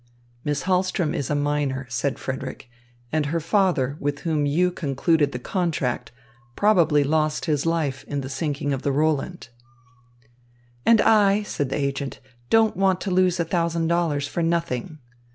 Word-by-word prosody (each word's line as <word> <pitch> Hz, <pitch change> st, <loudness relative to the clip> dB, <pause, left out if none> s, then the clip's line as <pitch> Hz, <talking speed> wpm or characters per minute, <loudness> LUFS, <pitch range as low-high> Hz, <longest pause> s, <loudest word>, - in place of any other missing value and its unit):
"Miss 145 Hz, -1 st, -1 dB
Hahlström 185 Hz, -3 st, +1 dB
is 140 Hz, -, -3 dB
a 150 Hz, -, +1 dB
minor," 145 Hz, -2 st, -1 dB
said 125 Hz, +3 st, -2 dB
Frederick, 130 Hz, -1 st, -6 dB, 0.4 s
"and 155 Hz, -2 st, 0 dB
her 165 Hz, +3 st, 0 dB
father, 165 Hz, -6 st, +1 dB
with 145 Hz, 0 st, -2 dB
whom 155 Hz, -3 st, 0 dB
you 180 Hz, +5 st, +2 dB
concluded 150 Hz, -1 st, +1 dB
the 125 Hz, -, -4 dB
contract, 125 Hz, -6 st, -2 dB, 0.4 s
probably 170 Hz, -8 st, +4 dB
lost 155 Hz, +1 st, 0 dB
his 150 Hz, -1 st, 0 dB
life 145 Hz, -5 st, -1 dB
in 145 Hz, -1 st, -3 dB
the 130 Hz, -, -6 dB
sinking 145 Hz, 0 st, -2 dB
of 135 Hz, -, -3 dB
the 140 Hz, -, 0 dB
Roland." 155 Hz, +1 st, -1 dB, 1.4 s
"And 230 Hz, -1 st, +6 dB
I," 210 Hz, -2 st, +4 dB
said 145 Hz, -9 st, -3 dB
the -, -, -2 dB
agent, 140 Hz, -1 st, -3 dB, 0.3 s
"don't 225 Hz, -1 st, +4 dB
want 190 Hz, -1 st, +2 dB
to 195 Hz, -, -2 dB
lose 185 Hz, -1 st, +2 dB
a 170 Hz, -, +1 dB
thousand 165 Hz, -1 st, 0 dB
dollars 160 Hz, -5 st, 0 dB
for 170 Hz, -, -3 dB
nothing." 165 Hz, -3 st, -1 dB
155 Hz, 155 wpm, -24 LUFS, 140-175 Hz, 1.4 s, And